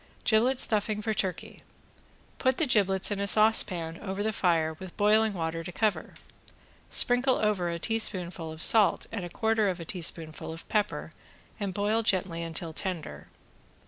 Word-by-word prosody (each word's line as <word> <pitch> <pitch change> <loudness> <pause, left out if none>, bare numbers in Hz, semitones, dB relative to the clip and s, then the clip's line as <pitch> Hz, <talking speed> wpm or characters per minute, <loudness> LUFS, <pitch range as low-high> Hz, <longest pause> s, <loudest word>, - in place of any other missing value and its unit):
~GIBLET 245 +4 +2
STUFFING 210 -2 +1
FOR 220 0 -1
TURKEY~ 190 -3 -4 0.8
Put 260 -1 +1
the 320 - +2
giblets 195 -6 +2
in 205 - -2
a 200 - -1
saucepan 185 -6 +2
over 195 0 -4
the 220 0 -1
fire 165 -5 +1
with 185 -2 -10
boiling 215 0 +3
water 165 -1 -3
to 180 - -7
cover, 215 +2 -2 0.7
sprinkle 250 +2 +3
over 205 -5 0
a 170 - -3
teaspoonful 180 -5 0
of 160 +1 -3
salt 220 -3 +4
and 205 -5 -4
a 175 - -6
quarter 220 +1 0
of 180 -1 -4
a 165 - -7
teaspoonful 160 -3 0
of 165 +1 -10
pepper 210 -1 -1 0.5
and 195 -3 -4
boil 210 +2 +1
gently 185 -5 -1
until 165 0 -5
tender. 160 - -4
195 Hz, 160 wpm, -28 LUFS, 170-220 Hz, 0.8 s, salt